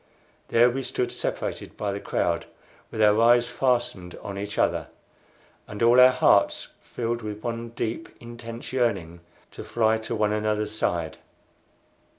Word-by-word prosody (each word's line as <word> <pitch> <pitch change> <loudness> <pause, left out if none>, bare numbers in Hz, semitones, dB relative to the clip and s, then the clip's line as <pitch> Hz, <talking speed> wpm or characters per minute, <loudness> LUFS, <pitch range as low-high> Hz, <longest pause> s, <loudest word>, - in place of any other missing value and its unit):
There 120 +1 +4
we 135 +2 -3
stood 125 -1 -2
separated - - -4
by 105 -1 -2
the 100 - -4
crowd, - - -1 0.4
with 110 - -1
our 105 +1 +5
eyes 120 +1 +5
fastened 120 -10 -1
on 100 - -6
each 100 +1 -5
other, - - +1 0.8
and 105 +2 -4
all 120 +2 +6
our 125 0 +9
hearts 125 -5 +3
filled 120 0 -3
with 105 -1 -6
one 115 0 -4
deep, 115 +5 -4
intense 120 0 -9
yearning 95 -10 -1 0.3
to - - -8
fly 110 -1 +1
to 115 +1 -4
one 105 -1 +1
another's 105 0 -1
side. 85 -6 -2
115 Hz, 150 wpm, -25 LUFS, 105-120 Hz, 0.8 s, our